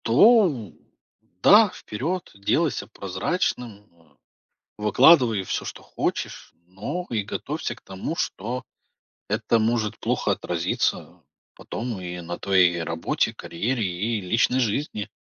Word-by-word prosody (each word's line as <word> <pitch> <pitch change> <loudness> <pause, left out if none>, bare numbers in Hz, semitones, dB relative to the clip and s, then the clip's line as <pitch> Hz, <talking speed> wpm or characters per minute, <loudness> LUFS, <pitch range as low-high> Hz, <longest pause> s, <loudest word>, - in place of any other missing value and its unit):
То 145 - +5 0.7
да, 210 +1 +8
вперед, 170 - -4
делайся 100 0 0
прозрачным, 105 - -3
э, 80 -4 -27 0.6
выкладывай 115 - +5
всё, - - -3
что - - -7
хочешь, - - -4
но 105 - -5
и 110 -3 -1
готовься - - -4
к - - -20
тому, 95 - -5
что 120 - -3 0.7
это 110 +2 +1
может 110 -1 0
плохо - - 0
отразиться - - -2 0.3
потом, 115 -3 -5
и 90 -1 -6
на 85 +1 -6
твоей 90 -3 +3
работе, 80 0 -1
карьере 115 +7 -2
и 100 +5 -1
личной 115 +7 +2
жизни. 110 -2 -1
110 Hz, 115 wpm, -24 LUFS, 95-125 Hz, 0.7 s, да